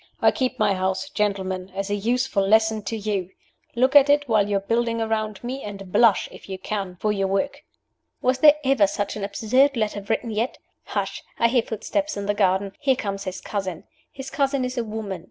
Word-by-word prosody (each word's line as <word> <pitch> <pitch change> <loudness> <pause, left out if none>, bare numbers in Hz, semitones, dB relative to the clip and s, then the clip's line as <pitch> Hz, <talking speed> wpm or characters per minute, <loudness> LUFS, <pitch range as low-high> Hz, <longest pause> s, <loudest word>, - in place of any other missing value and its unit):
I - - +5
keep 255 -1 -1
my 210 -2 +3
house, 190 +8 -1
gentlemen, 190 -3 -2
as 195 +1 -3
a - - +2
useful 235 +1 0
lesson 220 +2 +3
to 225 +4 -3
you. 200 -4 -2 0.5
Look 260 +4 +2
at 285 0 +8
it 290 0 +3
while 215 -3 +2
you 200 - +2
are - - -2
building 230 +2 0
around 215 -2 -2
me, 260 +3 -4
and 195 -2 -8
blush, 230 -2 +4
if - - -13
you 190 - -4
can, 195 -1 -4
for 210 +4 -1
your 195 -2 0
work.' 195 +9 -1 0.6
Was 255 +1 +1
there 295 +1 +8
ever 265 -7 +4
such 200 +1 -3
an 210 - -5
absurd 250 +7 +2
letter 210 -2 -1
written 225 +3 -2
yet? 225 +4 -1 0.3
Hush! - - -3 0.2
I 235 - +3
hear 245 0 +3
footsteps 290 +7 -3
in 200 - -3
the 205 - +1
garden. 195 -1 +1
Here 275 -3 +2
comes 200 -4 -4
his 185 0 -4
cousin. 190 -5 -4 0.3
His 270 0 -8
cousin 275 -2 +1
is 250 0 -4
a 240 - -1
woman. 215 -4 -5
215 Hz, 210 wpm, -24 LUFS, 195-250 Hz, 0.6 s, at